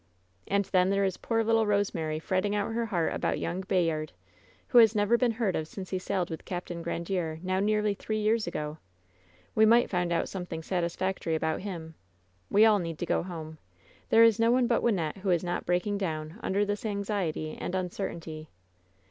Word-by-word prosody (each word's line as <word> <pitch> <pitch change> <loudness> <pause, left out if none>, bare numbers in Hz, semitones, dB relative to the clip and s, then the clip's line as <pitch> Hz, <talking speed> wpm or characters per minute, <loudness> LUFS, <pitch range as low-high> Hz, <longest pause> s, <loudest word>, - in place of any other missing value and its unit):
And 200 0 +1
then 185 0 +2
there 200 0 +2
is 190 -1 -1
poor 225 -1 0
little 225 -1 +2
Kosemary 170 -7 0
fretting 190 +5 0
out 205 +2 -1
her 230 0 -1
heart 175 -6 0
about - - -1
young 175 +3 -3
Bayard, 165 -5 0 0.6
who 245 - +7
has 225 -1 +6
never 205 +2 +3
been 235 -1 +2
heard 215 -5 0
of 155 - -2
since 185 +2 -8
he 185 - -1
sailed 185 -2 -2
with 160 - -6
Capt. 180 -1 -5
Grandiere, 170 -2 -3
now 185 0 0
nearly 210 0 +2
three 215 +2 -3
years 215 +1 +1
ago! 150 +1 -4 0.7
We 220 - +4
might 235 +2 +5
find 175 -2 0
out 170 - +1
something 175 -4 -5
satisfactory 175 -1 -1
about 160 0 -1
him. 170 -5 -6 0.6
We 210 +2 +6
all 215 -2 +5
need 165 -3 -4
to 175 - -3
go - - +1
home! 160 -3 -7 0.5
There 225 - +7
is 225 -1 +5
no 230 0 +4
one 250 0 +3
but 235 -1 +2
Wyn 235 -3 +2
nette 160 -1 -2
who 195 0 -3
is 175 -1 +2
not 175 0 -3
breaking 180 +3 0
down 160 0 -4
under 200 +2 +1
this 205 0 -3
anxiety 200 -7 -2
and 180 - -4
uncertainty! 170 -4 -4
190 Hz, 195 wpm, -29 LUFS, 170-210 Hz, 0.7 s, who